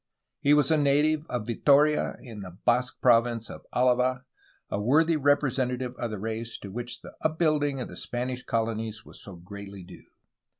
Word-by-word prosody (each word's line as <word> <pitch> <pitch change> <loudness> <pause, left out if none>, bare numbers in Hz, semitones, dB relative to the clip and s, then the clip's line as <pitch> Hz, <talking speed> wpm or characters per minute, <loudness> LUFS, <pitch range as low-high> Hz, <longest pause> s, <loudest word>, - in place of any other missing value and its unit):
He 145 +1 +4
was 150 0 +3
a 155 - +4
native 150 +2 +2
of 120 -4 -3
Vitoria 145 +6 +3
in 115 -5 -10
the 90 -2 -9
Basque 125 +1 +1
province 115 -2 +3
of - - -11
Alava, 125 +1 +2 0.5
a 100 - -1
worthy 160 +9 +3
representative 130 -4 +1
of 120 - -3
the 105 - -4
race 110 +2 -4
to 100 - -7
which 120 +2 -6
the - - -11
upbuilding 155 -3 +1
of 125 - -4
the - - -10
Spanish 125 +1 -3
colonies 110 -2 -2
was - - -10
so 100 - -10
greatly 100 +2 -10
due. 90 0 -14
125 Hz, 170 wpm, -27 LUFS, 110-140 Hz, 0.5 s, He